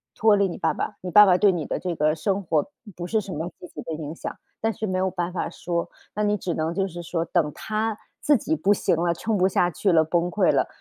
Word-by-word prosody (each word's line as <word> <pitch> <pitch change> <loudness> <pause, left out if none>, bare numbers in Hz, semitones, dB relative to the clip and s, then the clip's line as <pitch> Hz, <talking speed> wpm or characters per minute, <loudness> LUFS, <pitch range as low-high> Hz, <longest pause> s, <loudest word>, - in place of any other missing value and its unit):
脱 220 -2 +5
离 200 -1 +3
你 175 - -6
爸 - - +1
爸， 210 - -4
你 180 - -5
爸 210 +4 +9
爸 180 -2 +5
对 200 +1 +5
你 170 -5 -3
的 - - -2
这 180 -2 -2
个 155 0 +2
生 195 +5 -1
活 160 -3 +1 0.3
不 175 - -5
是 220 +3 +1
什 195 - -8
么 160 +3 -3
积 180 - -9
极 - - -9
的 165 - -5
影 155 0 -5
响。 - - -6 0.3
但 225 - +1
是 220 - -4
没 185 -1 -1
有 190 0 +1
办 175 -1 -2
法 - - -2
说， 170 -1 -3 0.3
那 210 - 0
你 210 0 +2
只 180 -3 -3
能 160 +1 -1
就 195 +2 0
是 175 -1 -7
说 165 0 -2
等 155 -2 +1
她 215 0 -2 0.2
自 295 -1 +4
己 310 +8 -1
不 205 -9 +1
行 195 - +1
了， 170 +1 +1
撑 220 +6 -2
不 185 0 +4
下 180 -2 +2
去 190 +4 +1
了 160 -2 +5
崩 170 +2 0
溃 180 0 +3
了， - - +2
180 Hz, 295 characters per minute, -24 LUFS, 170-205 Hz, 0.3 s, 爸